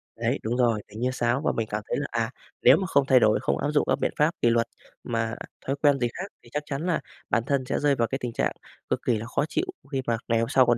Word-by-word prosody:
Đấy, - - 0
đúng 120 +3 -1
rồi, 115 -4 +2
tỉnh 105 +2 -10
như 125 +1 +1
sáo 120 +2 +1
và - - +1
mình 115 -1 -2
cảm 105 0 -1
thấy - - 0
là, 145 - -2
à, 115 -1 0 0.3
nếu - - +8
mà 190 - -2
không 140 -5 +3
thay 130 -2 +6
đổi, 110 -1 +4
không - - +1
áp 145 - -1
dụng 150 - +2
các - - +2
biện - - +1
pháp 150 +3 +4
kỷ 120 - +5
luật 115 0 +2 0.4
mà 115 -1 -1 0.3
thói 135 - 0
quen 145 -3 +4
gì 120 - +2
khác 190 - -4 0.2
thì 120 - -16
chắc 150 0 -1
chắn 145 +3 -3
là 180 - +1 0.3
bản 115 - +2
thân 140 -2 +1
sẽ - - -1
rơi 145 -1 +3
vào 115 -2 +1
cái 135 - -2
tình 120 -2 -3
trạng - - +1 0.4
cực - - +1
kỳ 115 -3 +3
là 110 - -5
khó 125 - 0
chịu 370 - 0 0.3
khi 135 -1 0
mà 115 -1 +2
ngày 115 -1 +2
hôm 115 +2 0
sau 130 -2 +5
còn 120 0 +3
125 Hz, 295 wpm, -26 LUFS, 115-140 Hz, 0.4 s, nếu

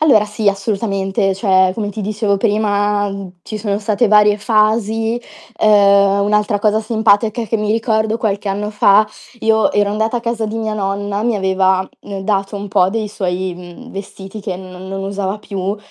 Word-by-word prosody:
Allora 265 -9 +5
sì 210 0 -1
assolutamente, 195 -1 -1
cioè, 190 -2 +3
come 210 0 -3
ti 205 +2 -6
dicevo 210 0 0
prima 205 -1 +1 0.3
ci 215 - -6
sono 205 -1 -2
state 215 +2 +1
varie 210 0 +5
fasi. 220 +1 +1 0.4
Ehm, 200 -1 +4
un'altra 210 0 +1
cosa 215 +1 +2
simpatica 220 0 +1
che 225 - 0
mi 210 -1 -2
ricordo 220 0 +1
qualche 210 -3 -2
anno 205 +2 -2
fa, 210 0 +4 0.3
io 220 0 +3
ero 205 -1 +1
andata 220 +3 0
a - - -2
casa 230 -1 -2
di 220 +1 -4
mia 220 -1 -2
nonna, 200 0 -2
mi 235 -1 +1
aveva, 190 -1 +1
mh, 200 -1 -7
dato 195 +1 -1
un 200 0 -5
po' 190 -2 +3
dei 220 +1 -2
suoi, 185 -2 -3
mhmm, 180 +8 -12
vestiti 195 +1 -8
che 190 -2 -4
non 185 -1 -10
non 195 0 -4
usava 195 +1 -3
più 200 -1 -4
205 Hz, 175 wpm, -17 LUFS, 195-220 Hz, 0.4 s, Allora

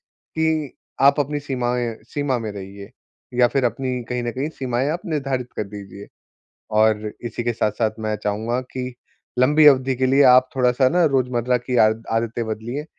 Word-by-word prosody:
कि 160 -3 -2 0.3
आप 140 +2 +5
अपनी 145 +1 -3
सीमाएँ 125 -4 -2 0.2
सीमा 145 -3 -1
में 110 -2 -4
रहिए। 100 0 -9 0.5
या 120 - +6
फिर 135 -2 +1
अपनी 125 0 -2
कहीं 125 -1 -2
न 120 - -2
कहीं 135 +5 -3
सीमाएँ 130 +1 -1
आप 170 - -3
निर्धारित 135 -7 -2
कर - - 0
दीजिए। 100 0 -10 0.7
और 110 -1 +2
इसी 120 +1 -4
के 120 0 0
साथ-साथ 110 0 0
मैं 110 -1 -2
चाहूँगा 110 +4 -1
की 125 -1 -4 0.5
लंबी 150 +4 +5
अवधि 135 -2 +4
के 130 +1 0
लिए 135 +2 +4
आप 130 0 +4
थोड़ा-सा 130 0 +3
ना 175 +2 +3
रोज़मर्रा 125 -3 +1
की 125 +1 -4
आदत 110 0 +3
आदतें 115 +1 -1
बदलिए, 120 +7 -4
125 Hz, 170 wpm, -22 LUFS, 115-135 Hz, 0.7 s, या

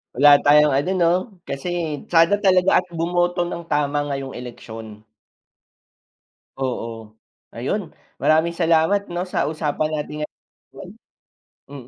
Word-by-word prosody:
Wala 145 +2 +7
tayong 150 0 +5
ano 145 +8 +1
'no, 170 -1 +3 0.4
kasi 155 +1 -3
sana 165 +4 +5
talaga 185 -1 +4
at - - -16
bumoto 175 +1 0
nang 170 -1 -6
tama 145 0 +1
ngayong 135 -1 -4
eleksyon. 110 -3 -10 1.5
Oo. 115 -4 -5 0.4
Ayun, - - -3 0.3
maraming 160 +2 +2
salamat 170 +4 +2
'no, 175 +1 -2
sa - - -1
usapan 155 0 -2
natin 150 0 -4
ngayon. - - -12 0.8
Mm. 135 -4 -10
150 Hz, 115 wpm, -21 LUFS, 135-175 Hz, 1.5 s, Wala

